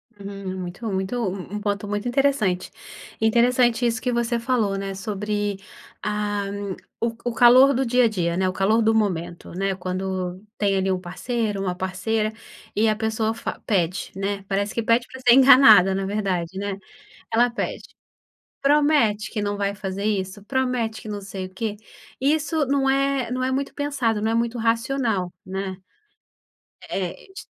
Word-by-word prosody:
Hum, 195 -2 -6
muito 180 +6 -6
muito, 190 +5 -2
um 195 -1 -4
um 210 - -4
ponto 205 0 -2
muito 205 +3 -2
interessante. 240 -9 +1 0.5
Interessante 240 +1 +3
isso 230 -2 0
que 250 - 0
você 235 0 0
falou, 230 -5 0
né, 195 0 -4
sobre, 205 0 -2 0.4
ah, 205 -1 -1 0.5
o 230 0 -1
o 240 - -1
calor 255 +4 +7
do 260 +1 0
dia 250 +1 +4
a - - +5
dia, 175 -5 -1
né, 185 0 +1
o - - -4
calor 215 +4 +2
do 220 0 +3
momento, 175 -5 -1
né, 195 +2 -1
quando 185 0 -4
tem 200 -2 +1
ali 190 0 +1
um 185 - 0
parceiro, 205 +4 -3
uma 185 -2 -2
parceira, 190 +4 -1 0.4
e 220 +2 +3
a 215 - +2
pessoa 220 0 -1
fa 225 - -5
pede, 185 -4 0
né? 195 0 -3
Parece 200 +1 -1
que 230 - -1
pede 230 +2 +2
pra 260 - -10
ser 245 -1 +6
enganada, 250 -8 +8
na 195 0 -1
verdade, 190 -3 -2
né? 200 -1 -3 0.6
Ela 240 +2 +4
pede: 235 - -4 0.8
"Promete 280 -7 +3
que 215 - -3
não 205 0 -1
vai 200 0 -1
fazer 195 0 -5
isso? 200 -1 -2
Promete 250 -3 -1
que - - -9
não 205 -1 -5
sei 190 -1 -6
o 185 - -16
quê?" 210 0 -3 0.4
Isso 310 +1 +1
não 270 0 +1
é 275 -2 +1
não 255 0 -2
é 260 - +1
muito 275 +1 -2
pensado, 265 -7 -1
não 220 +1 0
é - - 0
muito 235 +1 0
racional, 230 -5 0
né? 190 0 -4 1.1
É, 185 -3 -2 0.2
ti - - -9
210 Hz, 170 wpm, -23 LUFS, 195-240 Hz, 1.1 s, enganada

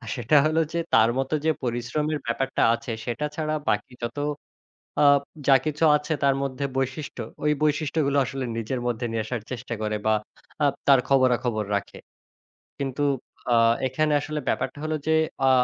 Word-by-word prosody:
সেটা 125 +5 +3
হলো 160 +1 +2
যে 170 - 0
তার 110 +1 +6
মত 135 +1 -1
যে 160 - +4
পরিশ্রমের 125 +6 -1
ব্যাপারটা 135 +3 -1
আছে, 115 - -4
সেটা 125 +5 -2
ছাড়া 155 -1 -1
বাকি 105 +4 -1
যত 120 +4 -4 0.8
আ - - +5 0.4
যা 135 - +7
কিছু 155 +1 -1
আছে 150 +2 -1
তার 135 -1 +4
মধ্যে 135 +1 -3
বৈশিষ্ট্য, 135 0 -3 0.2
ওই 150 - +3
বৈশিষ্ট্যগুলো 150 -1 +1
আসলে 135 0 -4
নিজের 120 +3 -2
মধ্যে 120 0 -2
নিয়ে 110 -1 -1
আসার 120 -1 -3
চেষ্টা 120 -1 -5
করে 105 0 -1
বা 110 - +4 0.5
আ - - +5 0.2
তার 135 -2 +7
খবরাখবর 125 -5 +2
রাখে। 100 - -4 0.8
কিন্তু 140 +1 -2 0.5
আ - - +5 0.3
এখানে 150 +4 +1
আসলে 155 0 -3
ব্যাপারটা - - -1
হলো 155 0 -1
যে 160 - +4 0.3
আ - - +6
135 Hz, 160 wpm, -25 LUFS, 120-150 Hz, 0.8 s, যা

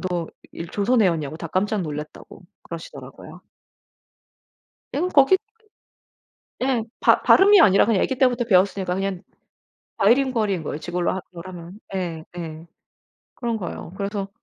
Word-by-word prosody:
"너 175 -3 -3 0.2
일 165 - -7
조선 220 +6 +2
애였냐."고 160 -6 0
다 165 - -6
깜짝 205 +5 0
놀랐다고 150 -1 -8 0.2
그러시더라고요. - - -10 1.5
에구 340 +6 0
거기 290 +2 +5 1.2
예. 250 -3 0 0.2
바 - - +4
발음이 400 0 +7
아니라 195 - +6
그냥 215 -4 +2
애기 265 - -1
때부터 250 -2 +2
배웠으니까 190 -3 +2
그냥 195 -1 -3 0.7
바이링구얼인 220 -4 +2
거예요. 150 0 -4
지금으로 175 +1 -2
하 190 - -3
거라면. 175 +2 -10 0.2
예. 170 -4 -4
예. 165 -1 -7 0.7
그런 235 -2 -2
거예요. 175 -3 -7
그래서 200 0 -3
195 Hz, 310 characters per minute, -23 LUFS, 175-235 Hz, 1.5 s, 발음이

